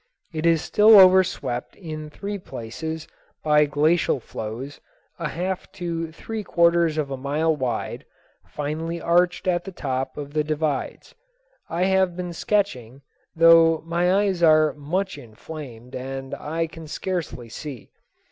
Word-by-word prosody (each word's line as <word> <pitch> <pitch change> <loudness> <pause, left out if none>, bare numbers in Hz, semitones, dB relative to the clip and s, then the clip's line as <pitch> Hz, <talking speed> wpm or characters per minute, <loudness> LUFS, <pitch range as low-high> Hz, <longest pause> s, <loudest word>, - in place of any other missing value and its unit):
It 160 +1 0
is 165 -2 +3
still 215 0 +7
overswept 185 -9 +3
in 155 -4 -7
three 200 +6 -5
places 160 +3 -6 0.4
by 150 -1 +4
glacial 150 +1 +2
flows 120 +5 -7 0.4
a 165 -3 -2
half 185 +2 -4
to 165 -2 -4
three 220 +6 -6
quarters 170 -3 +3
of 145 -3 -1
a 135 - -3
mile 150 +4 0
wide, 125 -5 -3 0.4
finely 160 +3 -4
arched 175 +2 +2
at 175 -1 +1
the 195 - -7
top 135 -6 -3
of 145 -1 -7
the 155 -1 +1
divides. 150 -2 -3 0.6
I 170 +2 0
have 190 -2 +2
been 180 -1 -4
sketching, 140 - -1 0.3
though 165 -1 +6
my 175 +2 +1
eyes 190 -4 -1
are 155 -2 +5
much 175 +4 -3
inflamed 125 0 -10
and 135 +1 -6
I 165 +2 -2
can 165 0 -10
scarce 180 +1 -3 0.3
see. 140 -7 -8
160 Hz, 140 wpm, -24 LUFS, 145-175 Hz, 0.6 s, still